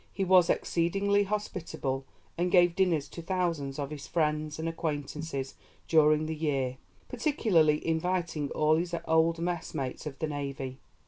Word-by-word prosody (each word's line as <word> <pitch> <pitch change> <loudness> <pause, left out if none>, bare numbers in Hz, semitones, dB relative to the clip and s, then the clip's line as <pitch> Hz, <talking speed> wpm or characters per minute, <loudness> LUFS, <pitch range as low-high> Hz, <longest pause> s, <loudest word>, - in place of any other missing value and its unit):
He 195 - -2
was 185 -2 +5
exceedingly 200 +4 +1
hospitable, 170 -10 -3 0.3
and 175 +1 0
gave 175 -2 +5
dinners 175 -7 +2
to 170 - -8
thousands 165 -6 -1
of 145 -1 -4
his 150 -2 -7
friends 155 -2 0
and 160 +1 -3
acquaintances 150 -3 -3 0.3
during 155 -1 +4
the 160 - -2
year, 135 -5 -1 0.3
particularly 200 - +2
inviting 165 -2 -1
all 155 +1 +3
his 170 +1 -2
old 160 +1 +3
messmates 165 -6 -3
of 135 -2 -7
the - - -1
Navy. 140 -3 -4
160 Hz, 140 wpm, -29 LUFS, 150-175 Hz, 0.3 s, was